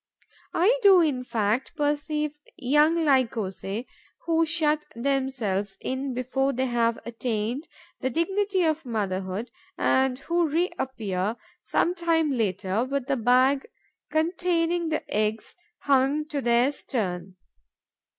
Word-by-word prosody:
I 450 +9 +3
do, 390 -4 +7
in 280 -6 +1
fact, 225 0 -1
perceive 295 +1 -1 0.2
young 300 +5 +3
Lycosae 225 -5 0 0.4
who 330 -1 +2
shut 310 -2 +2
themselves 235 -7 -1
in 260 0 -3
before 270 +2 0
they 260 +2 0
have 235 -2 +1
attained 235 +4 -3 0.3
the 260 - -1
dignity 385 - 0
of 320 -1 +1
motherhood 200 -2 -3 0.3
and 265 -1 +2
who 340 +4 0
reappear, 235 - -1 0.3
some 350 - +1
time 330 -3 +1
later, 200 -3 0
with 275 0 -2
the 275 - 0
bag 255 +3 +3 0.4
containing 335 +1 0
the 310 - -1
eggs 215 +1 -1 0.3
hung 280 +2 +2
to 290 -4 -2
their 240 +2 +3
stern. 190 -10 -4
265 Hz, 115 wpm, -26 LUFS, 230-315 Hz, 0.4 s, do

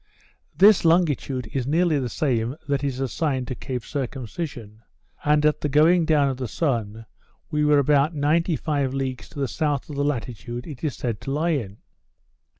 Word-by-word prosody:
This 205 0 +6
longitude 155 -7 +2
is 130 -2 -1
nearly 160 0 +2
the 125 -2 -2
same 120 -1 -1
that 140 -1 0
is 135 -2 -2
assigned 135 -1 -1
to - - -2
Cape 125 -2 -5
Circumcision; 125 - -5 0.4
and 150 0 +3
at 150 0 +2
the 150 - -1
going 160 +4 +4
down 150 -3 +3
of 135 -2 -2
the 130 -1 -3
sun 115 -7 -2 0.5
we 150 -1 +1
were 150 0 +4
about 145 +3 +3
ninety 160 +4 +2
five 140 -4 -1
leagues 130 -2 -4
to 155 - -9
the 135 - 0
south 145 +3 -2
of - - -6
the 140 - 0
latitude 120 -3 -3
it 150 -4 -9
is 150 -4 -1
said 115 -4 -3
to 135 - -5
lie 155 +5 0
in. 110 - -2
140 Hz, 180 wpm, -24 LUFS, 125-150 Hz, 0.5 s, This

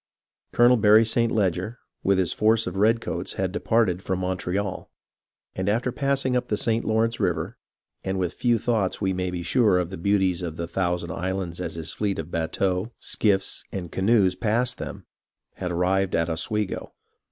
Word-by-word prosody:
Colonel 120 +1 +5
Barry 110 +1 +6
St. 115 +1 +1
Leger 100 +2 0 0.2
with 100 0 +2
his 95 -3 +1
force 110 +1 +3
of 90 - -4
redcoats 105 -4 +1
had 95 -1 -1
departed 100 -4 +1
from 95 -1 -2
Montreal, 95 +1 -3 0.6
and 95 +1 -1
after 120 +4 +1
passing 135 -1 0
up 125 0 0
the 105 - 0
St. 115 +1 +1
Lawrence 115 +1 +1
River, - - -1 0.4
and 95 0 -2
with 90 -3 -1
few 120 -2 +2
thoughts 110 -4 0
we 95 -2 0
may 90 0 -2
be 90 -1 -4
sure 105 +1 +3
of 90 -1 -1
the 95 - -5
beauties 95 -2 +1
of 85 -2 -5
the 85 - -2
Thousand 90 -1 -1
Islands 90 -1 -3
as - - -4
his 80 -1 -4
fleet 100 -2 -1
of 80 +1 -5
bateaux, 90 +5 -1
skiffs, 95 -3 -1
and 90 -4 -5
canoes 95 -1 +3
passed 120 +4 0
them, - - -7 0.5
had 90 -2 -3
arrived 95 +2 +1
at 85 0 +1
Oswego. 105 +5 -2
95 Hz, 175 wpm, -25 LUFS, 90-110 Hz, 0.6 s, Barry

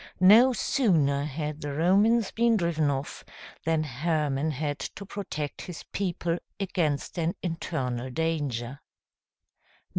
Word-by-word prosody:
No 215 +8 +8
sooner 160 - +2
had 150 +1 -4
the 145 -1 -4
Romans 200 +8 +3
been 230 0 +3
driven 165 -5 +1
off, 135 0 -3 0.4
than 160 -1 +2
Hermann 150 0 -1
had 145 0 -2
to 200 - -6
protect 175 -7 -5
his 175 -3 -8
people 175 -3 -1 0.2
against 175 -5 -1
an 165 +1 0
internal 130 -8 -3
danger. 140 -4 -2
160 Hz, 115 wpm, -27 LUFS, 145-185 Hz, 0.4 s, No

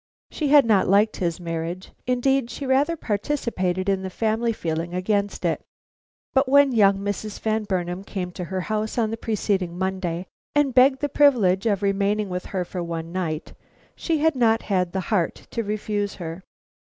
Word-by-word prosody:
She 305 - -2
had 285 -2 +7
not 210 -4 +3
liked 205 +3 +3
his 170 -2 -1
marriage; 170 +1 -4 0.2
indeed, 255 0 +1
she 275 +4 -6
rather 275 +5 +2
participated 200 - -1
in 195 -1 +1
the 190 - -4
family 225 +4 0
feeling 170 -3 -3
against 200 +2 -1
it, - - 0 0.7
but 265 0 +3
when 280 0 +6
young 200 -4 +4
Mrs. 205 +1 -4
Van 220 -1 -1
Burnam 180 -1 -2
came 185 -3 -4
to 180 0 -6
her 190 +1 -3
house 215 +3 -2
on 220 -2 +1
the - - -1
preceding 195 -6 -1
Monday, 185 -2 -2 0.3
and 290 -3 +3
begged 265 +1 +5
the 290 - +1
privilege 230 -9 +3
of 205 -2 0
remaining 200 +1 +1
with 180 0 -4
her 185 -2 -3
for 180 0 -5
one 165 -1 -5
night, 170 -4 -3 0.4
she 330 -2 -1
had 320 0 +2
not 225 -2 +3
had 180 -3 0
the 190 - -2
heart 175 -5 +1 0.2
to 230 - -1
refuse 205 -1 -2
her. 165 0 -6
200 Hz, 180 wpm, -24 LUFS, 180-235 Hz, 0.7 s, had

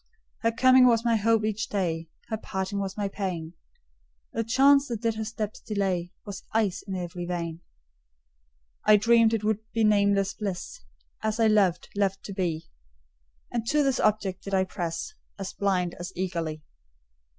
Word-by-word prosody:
Her 230 - +2
coming 255 +2 +6
was 230 -1 +3
my 230 -1 +3
hope 225 0 +2
each 215 0 -2
day, 165 -5 -1 0.2
Her 220 - -1
parting 190 -1 -3
was 195 0 -4
my 205 -1 0
pain; 180 -5 -4 0.8
The 230 - 0
chance 275 +4 +5
that 230 -3 -4
did 230 -1 +2
her 220 0 -4
steps 215 -1 -4
delay 190 -4 -1
Was 200 -3 -7
ice 215 -4 +1
in 190 - -3
every 175 -1 -5
vein. 170 -2 -4 1.2
I 215 0 +7
dreamed 230 +1 +5
it 225 -2 -1
would 215 -1 +1
be 225 0 +1
nameless 200 -2 +3
bliss, 195 -4 -5 0.4
As 220 +1 -1
I 225 - +4
loved, 205 -5 +3
loved 195 -1 0
to 200 - -6
be; 175 -5 -2 0.9
And 235 -2 -1
to 295 +3 +3
this 270 -2 +1
object 200 -3 +1
did 195 -1 -2
I 190 - +3
press 175 - -4 0.2
As 195 -2 -5
blind 185 -3 0
as 175 +1 -5
eagerly. 170 -4 -3
200 Hz, 165 wpm, -27 LUFS, 185-225 Hz, 1.2 s, I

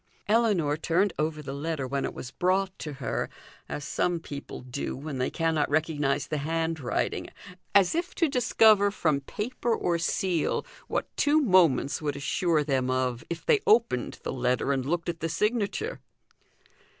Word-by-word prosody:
Ellinor 205 -10 +2
turned 180 +5 +1
over 155 0 -1
the 135 -1 -5
letter 150 -1 -3
when 135 +1 -1
it - - -4
was 125 - -7
brought 185 +3 +1
to 150 - -5
her, 135 -2 -3 0.4
as 145 - -4
some 175 +3 0
people 145 -3 -8
do 130 +2 -4
when 140 -1 -5
they 130 - +1
cannot 160 -2 0
recognise 145 -2 +1
the 155 - -2
handwriting, 160 -3 -1 0.5
as 195 -3 +5
if 345 +2 -2
to 335 - +3
discover 220 -6 +4
from 155 -8 0
paper 230 - -2
or 170 -1 0
seal 170 -1 0 0.2
what - - -3
two 295 +2 +4
moments 180 - +3
would 145 -2 -2
assure 155 +3 +1
them 135 -3 0
of, 130 -2 0
if 170 -1 -5
they 440 - +4
opened 215 - +3
the - - -3
letter 125 +1 0
and 130 -1 -2
looked 170 +2 -1
at 170 -1 -3
the 165 - -2
signature. 215 - -1
160 Hz, 160 wpm, -27 LUFS, 140-195 Hz, 0.5 s, as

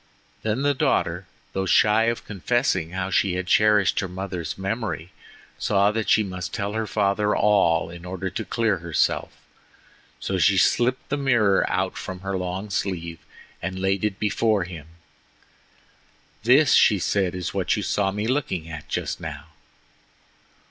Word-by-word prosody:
Then 110 +5 -1
the 145 0 +3
daughter, 130 - 0 0.3
though 95 0 -1
shy 105 +5 +4
of 115 0 -1
confessing 100 -4 0
how 95 +2 -3
she 95 -1 +2
had 95 0 -2
cherished 105 +1 +3
her 95 - -2
mother's 90 -3 -5
memory, 95 -3 -3 0.5
saw 100 0 +2
that 110 0 -2
she 110 - +5
must 90 -3 -5
tell 100 -2 -3
her 110 0 -2
father 105 0 +1
all 85 -6 +3
in 85 0 -10
order 95 +1 -4
to 110 - -4
clear 110 -4 0
herself. 85 -1 0 0.9
So 95 -1 -2
she 95 +3 +4
slipped 125 +7 +2
the 145 - 0
mirror 120 -8 +2
out - - -1
from 95 -1 -7
her 95 0 -3
long 95 +3 -4
sleeve 85 -4 -3 0.4
and 95 +1 -4
laid 95 +1 0
it 105 -3 -1
before 105 -1 +1
him. 85 -4 -9 1.5
"This," 130 +8 +5
she 105 - +5
said, 95 0 0
"is 90 -1 -4
what - - 0
you - - -2
saw 100 -2 +1
me 105 +2 -3
looking 115 - -1
at 80 -2 -8
just - - -3
now." 75 -2 -7
95 Hz, 155 wpm, -24 LUFS, 90-105 Hz, 1.5 s, she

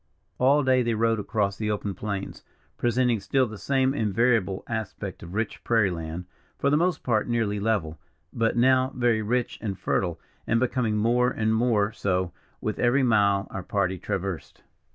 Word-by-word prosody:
All 140 +3 +4
day 130 -1 +3
they 115 -2 0
rode 115 0 +1
across 100 -1 -1
the 110 -1 -2
open 105 -1 -2
plains, 100 +1 -5 0.3
presenting 120 -1 +1
still 130 +7 +1
the 110 -3 -8
same 135 +4 +1
invariable 110 -4 +1
aspect 105 -4 -5
of 85 +3 -9
rich 110 0 -3
prairie 110 -5 +2
land, 85 +1 -5 0.3
for 140 - +1
the - - +4
most 170 +1 +1
part 110 -4 +1
nearly 115 -4 0
level, 100 -8 -1 0.3
but 115 0 0
now 130 +2 +4
very 120 -3 +2
rich 120 +3 -1
and 100 -4 -3
fertile, 85 -4 -1 0.3
and 115 - +2
becoming 120 -3 0
more 120 +3 +3
and 110 -2 0
more 110 -3 +2
so, 95 -4 -1 0.3
with 110 - -3
every 125 +3 +3
mile 100 -4 +3
our 95 - -4
party 95 -1 -1
traversed. 95 -3 -4
110 Hz, 170 wpm, -26 LUFS, 100-120 Hz, 0.3 s, All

